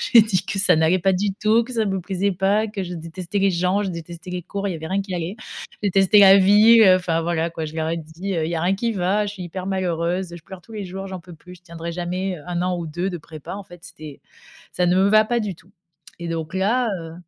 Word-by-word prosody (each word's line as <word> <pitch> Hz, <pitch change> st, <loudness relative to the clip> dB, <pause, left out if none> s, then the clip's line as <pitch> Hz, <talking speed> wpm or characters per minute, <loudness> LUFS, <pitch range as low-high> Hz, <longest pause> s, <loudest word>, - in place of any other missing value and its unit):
J'ai 230 Hz, -, +11 dB
dit 200 Hz, -5 st, -1 dB
que -, -, -3 dB
ça 185 Hz, -4 st, +4 dB
n'allait 160 Hz, +4 st, +3 dB
pas 190 Hz, +1 st, +2 dB
du 200 Hz, +2 st, 0 dB
tout, 220 Hz, +3 st, +2 dB
que 255 Hz, -, -9 dB
ça 225 Hz, -2 st, +1 dB
ne 195 Hz, -, -1 dB
me 190 Hz, -, -1 dB
plaisait 195 Hz, +2 st, -1 dB
pas, 195 Hz, +4 st, +1 dB
que 205 Hz, -2 st, -4 dB
je 180 Hz, -1 st, -6 dB
détestais 170 Hz, +4 st, -5 dB
les 195 Hz, -, +3 dB
gens, 180 Hz, +3 st, +1 dB
je 200 Hz, -, -2 dB
détestais 170 Hz, +1 st, -9 dB
les 180 Hz, -1 st, -4 dB
cours, 200 Hz, +3 st, -4 dB
il -, -, -2 dB
y -, -, -5 dB
avait 160 Hz, -, -7 dB
rien 195 Hz, +3 st, 0 dB
qui 195 Hz, -2 st, -6 dB
allait. 175 Hz, +4 st, -4 dB, 0.4 s
Je -, -, -21 dB
détestais 195 Hz, +1 st, +4 dB
la 195 Hz, 0 st, +9 dB
ville, 210 Hz, +4 st, +7 dB
enfin 165 Hz, -2 st, -1 dB
voilà 170 Hz, 0 st, 0 dB
quoi, 165 Hz, -1 st, -5 dB
je 155 Hz, -, -9 dB
leur 160 Hz, 0 st, -2 dB
ai 170 Hz, -, -1 dB
dit: 165 Hz, +5 st, -6 dB
«Heu, 160 Hz, -, 0 dB
il -, -, -4 dB
y 170 Hz, -, -2 dB
a -, -, -1 dB
rien 185 Hz, +2 st, +2 dB
qui 230 Hz, +2 st, -1 dB
va, 195 Hz, +2 st, 0 dB
je 205 Hz, -, -5 dB
suis 185 Hz, -, -7 dB
hyper 180 Hz, +2 st, -6 dB
malheureuse, 180 Hz, -1 st, -2 dB
je 165 Hz, -, -13 dB
pleure 190 Hz, 0 st, -11 dB
tous 225 Hz, -, -16 dB
les 210 Hz, -2 st, -5 dB
jours, 190 Hz, +2 st, -6 dB
j'en 190 Hz, -1 st, -6 dB
peux 175 Hz, 0 st, -13 dB
plus, 180 Hz, +3 st, -14 dB
je 175 Hz, -, -25 dB
tiendrai 170 Hz, -1 st, -7 dB
jamais, 180 Hz, +2 st, -3 dB
heu, 145 Hz, -, -14 dB
1 175 Hz, -1 st, -2 dB
an 180 Hz, 0 st, 0 dB
ou 170 Hz, -, -5 dB
2 175 Hz, +5 st, -3 dB
de 180 Hz, -, -4 dB
prépa, 155 Hz, +2 st, -9 dB
en 200 Hz, -, -6 dB
fait 175 Hz, -2 st, -15 dB
c'était 150 Hz, -4 st, -11 dB, 0.5 s
ça 180 Hz, -, 0 dB
ne 175 Hz, +1 st, +3 dB
me 190 Hz, +1 st, +4 dB
va 215 Hz, +1 st, +5 dB
pas 235 Hz, +2 st, 0 dB
du 205 Hz, -4 st, -3 dB
tout» 185 Hz, +4 st, -23 dB, 0.5 s
et 170 Hz, -, -6 dB
donc 165 Hz, -1 st, -4 dB
là, 230 Hz, +6 st, +1 dB
heu 165 Hz, 0 st, -9 dB
185 Hz, 290 wpm, -22 LUFS, 170-200 Hz, 0.5 s, J'ai